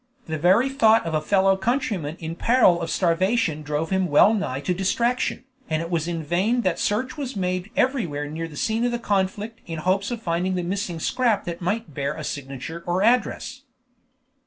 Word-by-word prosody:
The 160 -1 -4
very 190 - +4
thought 225 -6 +4
of 165 - -3
a 155 - +1
fellow 195 +3 +3
countryman 190 - -1
in 160 0 -5
peril 205 -5 +4
of 165 - -3
starvation 175 -2 +1
drove 150 +3 -3
him 190 -1 +2
well 170 +8 +5
nigh 195 -11 -2
to 160 +6 0
distraction, 235 +7 0 0.3
and 155 -1 0
it 165 +1 -5
was 165 -1 0
in 165 -2 -3
vain 195 +10 +1
that 185 -6 0
search 255 +8 -1
was 270 -4 -4
made 185 0 -2
everywhere 175 - 0
near 160 +2 -4
the 150 -2 -11
scene 225 +7 0
of 240 -1 0
conflict 205 +3 -1
in 165 -1 -5
hopes 185 +5 0
of 240 -2 -3
finding 185 -2 -1
the 180 - -1
missing 185 -2 -3
scrap 240 +2 +1
that 170 -1 -5
might 190 -2 -2
bear 140 0 -2
a - - -6
signature 140 +4 -6
or 180 +2 +1
address. 250 +3 +1
185 Hz, 190 wpm, -24 LUFS, 165-225 Hz, 0.3 s, well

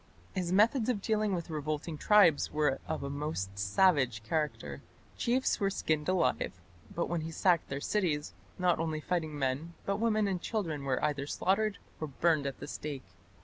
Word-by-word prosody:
His 180 -3 -2
methods 220 +5 +4
of 240 -5 +1
dealing 215 -1 +1
with 170 -1 -5
revolting 155 +1 -3
tribes 170 -3 +5
were 150 -3 +1
of - - -3
a 140 - -3
most 140 -10 -3
savage 125 - +3
character. 155 +5 -2 0.3
Chiefs 255 +2 +1
were 195 - +2
skinned 155 -4 -1
alive, 130 - +1 0.4
and 170 - +1
when 170 -1 -1
he 160 - -4
sacked 170 +1 +2
their 140 - -3
cities, 165 -8 0 0.2
not 180 -2 +2
only 160 -1 -1
fighting 160 -2 -2
men 140 +5 -2
but 200 0 0
women 215 -2 +2
and 185 -3 -1
children 165 -11 -2
were 135 +1 +1
either 145 -2 -1
slaughtered 200 +6 +1 0.2
or 155 - -3
burned 150 0 +1
at 135 - -4
the - - -6
stake. 145 -3 -5
160 Hz, 175 wpm, -31 LUFS, 145-190 Hz, 0.4 s, tribes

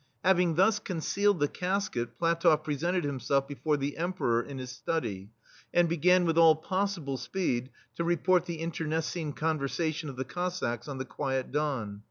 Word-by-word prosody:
Having 180 -3 +4
thus 195 +4 +4
concealed 200 +1 0
the 145 - +3
casket, 160 - -2
PlatofF 165 -2 +3
pre 150 -1 -1
sented 175 +4 0
himself 140 -1 0
before 150 +1 -1
the 140 +1 -3
Emperor 165 -9 0
in 135 +3 -8
his 130 -1 -6
study, 115 - -3 0.5
and 175 -1 +5
began, 180 +2 +4
with 165 0 +2
all 165 -1 +8
possible 175 -4 -2
speed, 125 -1 -2 0.3
to 170 - 0
report 175 +1 +2
the 165 -2 -4
internecine 160 -1 -2
con 155 +1 -1
versation 155 +2 -2
of 135 - -7
the 130 +1 -3
Cossacks 175 -10 -3
on 140 -2 -5
the 130 - -4
quiet 135 -2 -2
Don. 130 -9 -2
155 Hz, 170 wpm, -29 LUFS, 135-175 Hz, 0.5 s, all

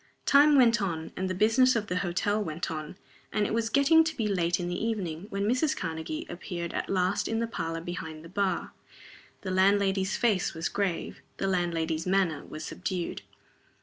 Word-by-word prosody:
Time 290 +1 +6
went 235 -5 +5
on, 165 -4 -3
and 185 0 -2
the 185 - -2
business 225 +6 +4
of 220 -2 0
the 180 -2 -2
hotel 200 +3 0
went 165 -1 -4
on, 155 +2 -6 0.3
and 210 -1 +1
it - - -2
was 225 0 0
getting 280 +6 +5
to 320 0 -3
be 220 - 0
late 175 -3 +1
in 175 - -2
the 175 +3 -3
evening, 195 -6 -3
when 200 0 -2
Mrs. 255 +6 +1
Karnegie 165 - -4
appeared 175 -1 -5
at - - -3
last 185 0 +1
in 225 - -1
the 230 - 0
parlor 165 -7 -4
behind 160 -2 -6
the - - -8
bar. 195 +1 -1 0.7
The 190 - -4
landlady's 190 0 +2
face 200 -7 +1
was 165 +2 -2
grave, 195 -4 -2 0.2
the - - -2
landlady's 170 -3 -1
manner 185 -6 +1
was 155 0 -8
subdued. 180 -2 -4
190 Hz, 185 wpm, -28 LUFS, 170-215 Hz, 0.7 s, Time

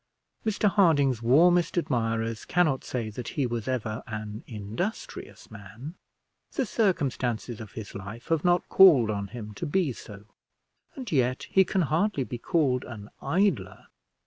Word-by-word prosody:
Mr 215 -1 +1
Harding's 150 - +3
warmest 170 +10 +4
admirers 115 -6 -1
cannot 155 -7 +1
say 115 -4 -4
that 120 +2 -7
he 140 - +2
was 120 -3 -3
ever 115 -3 -2
an 110 -1 -6
industrious 110 - -6
man; 110 - -9 0.6
the 270 - 0
circumstances 130 - -1
of 110 - -10
his 110 -3 -8
life 100 +5 -9
have 165 -2 +1
not 175 0 +2
called 140 - +7
on 100 -1 -3
him 105 0 -8
to - - -5
be 155 -3 +1
so; 105 -2 -11 0.7
and 255 -6 -7
yet 130 -3 +1
he 190 - +6
can 185 0 0
hardly 160 +1 +1
be 120 -1 -6
called 135 -5 +1
an 105 -3 -9
idler. 160 - 0
125 Hz, 145 wpm, -27 LUFS, 110-170 Hz, 0.7 s, called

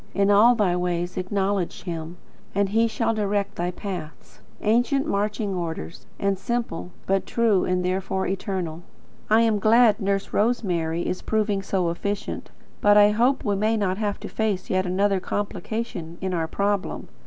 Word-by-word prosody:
In 200 0 +3
all 225 +5 +6
thy 195 -6 +2
ways 180 0 -1
acknowledge 190 0 -1
Him, 165 0 -5 0.4
and 200 -1 +2
He 225 +3 +3
shall 225 +1 0
direct 205 -1 -1
thy 175 +1 -1
paths." 180 -4 -7 0.2
Ancient 245 +6 +2
marching 205 -2 -1
orders, 165 - -5
and 200 -1 0
simple; 225 -5 -3 0.2
but 195 0 0
true, 225 -5 +2
and 180 0 0
therefore 190 +1 -1
eternal. 185 -4 -3 0.5
I 220 +1 +5
am 225 -2 +2
glad 225 +2 +5
Nurse 195 -1 -1
Rosemary 175 -7 0
is 185 - -2
proving 210 -2 0
so 185 -3 0
efficient, 200 +4 -4 0.3
but 205 0 +6
I 205 0 +7
hope 245 +6 +2
we 205 -1 +1
may 215 +3 +1
not 195 -2 0
have 205 -2 -1
to - - -5
face 210 -4 -2
yet 185 0 +1
another 195 +2 +2
complication 200 -3 -4
in 190 -1 -2
our 165 -2 0
problem. 200 +3 -1
200 Hz, 160 wpm, -24 LUFS, 180-215 Hz, 0.5 s, I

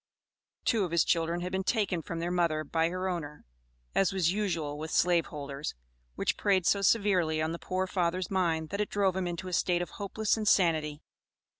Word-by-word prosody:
Two 225 -3 +2
of 180 - -2
his 170 0 +3
children 170 +1 0
had 180 +1 -4
been 190 0 -1
taken 195 -5 0
from 165 - -6
their 170 +1 -2
mother 170 -3 +1
by 160 +2 +1
her 185 +2 -3
owner, 155 -5 -5 0.5
as 195 - +3
was 185 -3 +1
usual 165 -8 -2
with 160 +1 -5
slave 175 -1 +3
holders, 140 0 -5 0.4
which - - 0
preyed 190 -3 +2
so 200 - +3
severely 190 -7 +2
on 155 +1 0
the 170 - -5
poor 185 0 -1
father's 180 0 -1
mind 165 -4 0
that 200 +1 -2
it 210 - -1
drove 195 -2 +1
him 190 -1 -1
into 175 +1 -4
a 180 - -5
state 175 0 +2
of - - -9
hopeless 205 +1 -1
insanity. 160 -8 +2
175 Hz, 195 wpm, -30 LUFS, 160-190 Hz, 0.5 s, his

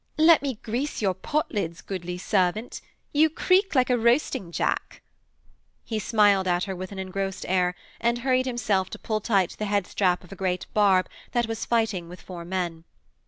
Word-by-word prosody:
'Let 315 0 +6
me 275 -3 -2
grease 250 +7 -2
your 190 -2 +2
potlids, 195 - -2
goodly 180 -2 -5
servant. 195 +4 0 0.3
You 310 +2 +5
creak 370 +3 +2
like 255 -1 +3
a 245 - +4
roasting 235 - +1
jack.' - - -2 0.8
He 220 -2 -3
smiled 205 -3 +3
at 175 0 +1
her 190 -1 -3
with 185 +2 -6
an 200 - -8
engrossed 190 0 -3
air, 180 -1 +1 0.2
and 235 +1 +1
hurried 255 0 +2
himself 210 -6 0
to - - -7
pull 215 -1 -2
tight 195 -5 +1
the 215 - -1
headstrap 195 -2 +1
of 180 - -16
a - - -7
great 180 -2 -1
barb 195 -3 +4 0.3
that 240 -1 +2
was 225 0 -4
fighting 220 -7 0
with 180 - -10
four 175 -2 -8
men. 175 -2 -3
200 Hz, 175 wpm, -26 LUFS, 185-235 Hz, 0.8 s, Let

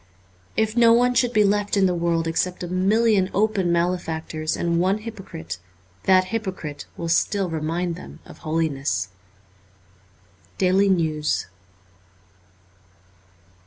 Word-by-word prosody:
If 220 0 +1
no 230 -1 +6
one 245 +1 +4
should 245 0 +2
be 215 -3 +4
left 205 0 +1
in 195 - +4
the 180 - +2
world 170 -1 0
except 180 +3 -1
a - - -3
million 195 +2 +2
open 200 -3 +1
male 170 +1 +2
factors 160 -1 -4
and 170 -1 0
one 190 +3 +2
hypocrite, 195 - -8 0.5
that 185 -1 +4
hypocrite 190 -9 -4
will 170 - -4
still 185 +2 +1
remind 165 +2 -2
them 180 - -11
of - - -13
holiness. 155 - -1 0.8
* 90 -1 -33
Daily 195 +1 +3
News.' 155 -5 +1
180 Hz, 125 wpm, -23 LUFS, 160-200 Hz, 0.8 s, no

